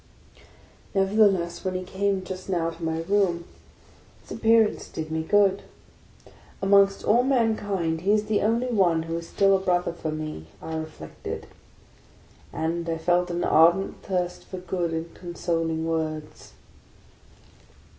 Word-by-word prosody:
Nevertheless, 195 -3 +2
when 185 -1 -2
he 185 - -2
came 195 +1 -1
just 185 +1 -7
now 165 -3 0
to 165 +1 -11
my 160 0 -1
room, 175 -2 +1 0.8
his - - -17
ap - - -11
pearance 225 -1 +3
did 160 -1 -5
me 160 0 -1
good. 200 +3 +3 1.0
Amongst 195 0 +4
all 230 +3 +4
mankind 205 -10 0
he 195 +3 +2
is 210 0 +3
the 215 -1 +1
only 230 +4 +1
one 185 -9 +2
who 165 0 -4
is 165 - -11
still 195 -1 +4
a - - +1
brother 180 -2 0
for 165 -2 -5
me, 155 - -6
I 160 - -6
reflected; 160 0 -7 1.1
and 165 +1 -2
I 165 - -1
felt 175 +2 +1
an 175 0 -2
ardent 170 +4 +4
thirst 180 -2 -3
for 185 - -7
good 180 -1 -2
and 165 +1 -4
consoling 165 -2 -2
words. 155 -2 -4
180 Hz, 145 wpm, -25 LUFS, 165-195 Hz, 1.1 s, Amongst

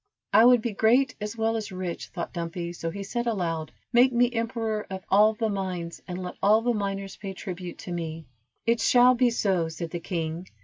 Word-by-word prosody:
"I 220 +3 +7
would 245 -2 +6
be 235 - -2
great 245 +5 +3
as 210 +2 -4
well 225 0 +1
as 215 -2 -4
rich," 185 -2 -4
thought 170 - -6
Dumpy, 170 0 -4
so 165 -1 -4
he 200 +4 -5
said 240 +4 -3
aloud: 165 -8 -2 0.2
"Make 245 +2 +6
me 245 0 +2
emperor 225 -2 -2
of 190 -1 -6
all 215 +2 +5
the 225 0 0
mines, 185 -4 -4
and 180 -1 -4
let 180 - -6
all 215 +3 +4
the 240 0 +2
miners 195 -2 -3
pay 195 -2 -6
tribute 180 -2 -7
to 180 - -8
me." 165 -2 -4 0.4
"It 230 0 +2
shall 250 0 +6
be 250 0 +3
so," 190 -7 +1
said 165 0 -6
the 175 - -3
king. 165 +1 -4
200 Hz, 210 wpm, -26 LUFS, 175-230 Hz, 0.4 s, I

